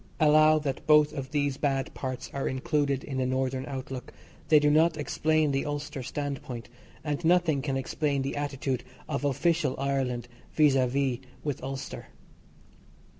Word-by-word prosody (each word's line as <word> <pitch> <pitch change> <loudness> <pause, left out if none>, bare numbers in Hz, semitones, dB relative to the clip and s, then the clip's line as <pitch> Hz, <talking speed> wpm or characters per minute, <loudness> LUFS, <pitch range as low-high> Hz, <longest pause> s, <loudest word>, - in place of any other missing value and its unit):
Allow 155 0 +6
that 140 -3 -3
both 150 -1 +6
of 135 -3 -5
these 145 -2 0
bad 135 -3 -1
parts 130 -2 -5
are 140 - -2
included 140 +1 0
in 135 -2 -4
the 130 - +1
Northern 130 0 -1
outlook, 130 -2 -6 0.4
they 155 -1 +7
do 150 0 +3
not 160 +1 +4
explain 155 +1 +1
the 135 0 0
Ulster 145 -1 -4
standpoint; 130 -3 -5 0.3
and 150 +2 -2
nothing 165 -4 +3
can 135 -1 -1
explain 140 +1 -1
the 135 - -3
attitude 135 -3 -2 0.2
of 145 -1 -2
official 145 0 +1
Ireland 130 -3 -1 0.3
vis 150 -3 +5
a 130 -1 +3
vis 130 -1 0 0.2
with 145 -4 -3
Ulster. 135 0 -6
140 Hz, 155 wpm, -28 LUFS, 130-150 Hz, 0.4 s, they